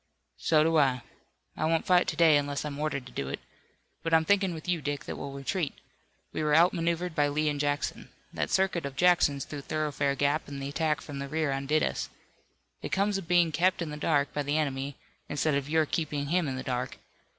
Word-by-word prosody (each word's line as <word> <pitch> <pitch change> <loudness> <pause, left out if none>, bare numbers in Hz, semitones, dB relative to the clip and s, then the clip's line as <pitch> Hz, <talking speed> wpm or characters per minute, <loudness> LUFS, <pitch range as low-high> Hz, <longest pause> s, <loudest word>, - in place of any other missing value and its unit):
"So 155 -2 +4
do 165 0 +3
I. 130 -4 +2 0.5
I - - -1
won't 165 0 +1
fight 180 -1 +4
to - - -1
day, 160 -1 +6
unless 145 0 0
I'm 145 -1 -5
ordered 150 -4 -2
to 125 - -11
do 70 - -4
it. 70 - -4 0.6
But 165 0 +2
I'm 160 0 +4
thinking 195 0 +3
with 160 0 -7
you, 175 -3 0
Dick, 145 0 -3
that - - -5
we'll 140 - -6
retreat. 140 +4 -2 0.6
We - - -2
were 150 -1 +2
outmaneuvered 170 0 +2
by 145 -1 +2
Lee 150 +2 0
and 145 -1 -2
Jackson. 145 -1 -2 0.2
That - - -2
circuit 190 -3 +1
of 140 -1 -5
Jackson's 150 -4 +3
through 145 -2 -7
Thoroughfare 145 -2 -1
Gap 145 +3 0
and 140 -1 -6
the 135 0 -4
attack 155 +1 0
from 140 -2 -7
the 140 - -4
rear 155 0 0
undid 140 +3 +1
us. - - -2 0.7
It - - -5
comes 200 0 +1
of 180 - -10
being 175 -2 +4
kept 175 +4 +2
in 165 -3 -3
the - - -5
dark 145 -1 +1
by 145 - -1
the 145 +2 0
enemy, 140 -2 -2 0.3
instead 150 +1 0
of 140 0 -1
your 160 0 +3
keeping 145 -2 -2
him 175 -1 +2
in 130 - -2
the 130 - -5
dark. 125 0 -3
150 Hz, 220 wpm, -29 LUFS, 140-165 Hz, 0.7 s, day